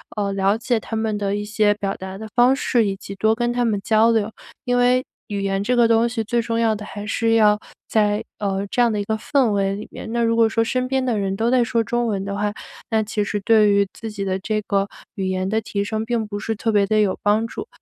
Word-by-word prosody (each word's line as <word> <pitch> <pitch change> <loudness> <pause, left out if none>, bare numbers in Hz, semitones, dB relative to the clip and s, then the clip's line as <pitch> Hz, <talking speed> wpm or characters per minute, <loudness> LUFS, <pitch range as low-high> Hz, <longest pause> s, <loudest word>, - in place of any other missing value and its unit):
呃， 200 -2 -1
了 195 +2 +2
解 235 0 0
他 225 - -6
们 220 -1 -1
的 200 -1 -1
一 205 0 -3
些 210 0 +2
表 200 -1 -2
达 190 0 -7
的 220 +2 -7
方 250 +2 +5
式， 235 -5 +1
以 195 - -1
及 195 - -9
多 220 +3 +2
跟 240 +1 -1
他 245 0 +1
们 215 -3 0
交 220 +1 +4
流。 220 -1 +1 0.3
因 245 -1 +1
为， 250 +1 +3 0.2
语 205 -2 -3
言 195 0 0
这 250 +4 +1
个 235 -1 +5
东 230 +1 +3
西 230 -1 -2
最 235 +2 0
重 230 0 -2
要 225 -1 +3
的 210 0 -6
还 205 0 -7
是 225 +2 +1
要 210 -2 +4 0.3
在， 210 -1 +1 0.2
呃， 195 -1 -1
这 245 - +1
样 235 - +4
的 210 - -1
一 - - -1
个 220 +2 -1
氛 250 +2 +1
围 195 -1 0
里 210 +2 -7
面。 - - -8
那 235 0 0
如 230 0 +2
果 230 -1 +4
说 225 +1 +1
身 255 +2 -1
边 265 0 0
的 235 -4 0
人 195 -1 -1
都 225 +4 0
在 255 -1 +4
说 230 0 0
中 240 +2 -1
文 200 -3 -1
的 200 0 -3
话， 205 +1 -1 0.4
那 220 -1 +2
其 210 0 -2
实 205 0 -2
对 215 0 +4
于 200 -1 +3
自 225 - -7
己 200 -2 -5
的 190 0 -1
这 215 +2 -1
个 200 -1 0 0.3
语 190 -2 -3
言 185 0 -1
的 220 +3 0
提 200 -2 -2
升 215 +1 -2
并 230 -1 -1
不 205 -1 -5
是 225 +1 -3
特 225 +2 -1
别 205 -2 +3
地 215 +1 +2
有 200 -3 0
帮 210 +2 +2
助。 320 - -7
215 Hz, 290 characters per minute, -21 LUFS, 205-230 Hz, 0.4 s, 方